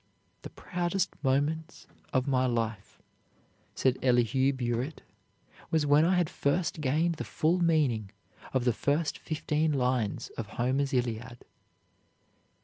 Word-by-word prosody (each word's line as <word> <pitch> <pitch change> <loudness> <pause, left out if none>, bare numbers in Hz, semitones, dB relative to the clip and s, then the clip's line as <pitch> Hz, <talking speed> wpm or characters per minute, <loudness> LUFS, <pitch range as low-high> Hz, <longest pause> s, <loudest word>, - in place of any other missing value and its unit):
"The - - -8
proudest 175 0 -2
moment 150 +5 0 0.3
of 130 -1 +1
my 130 -2 +2
life," 115 -4 -3 0.8
said 130 -1 +1
Elihu 125 +1 +3
Burritt, 125 +2 -3 0.7
"was 160 -2 +2
when 145 +2 +5
I 185 +2 +3
had 175 -2 +2
first 155 +2 -1
gained 155 +4 +1
the - - -3
full 165 +4 +1
meaning 145 - +2 0.4
of 130 -2 0
the 125 - +3
first 145 +6 0
fifteen 155 0 -1
lines 125 -5 -1
of 110 - -3
Homer's 135 +3 +1
Iliad." 120 -1 -2
135 Hz, 125 wpm, -29 LUFS, 125-160 Hz, 0.8 s, when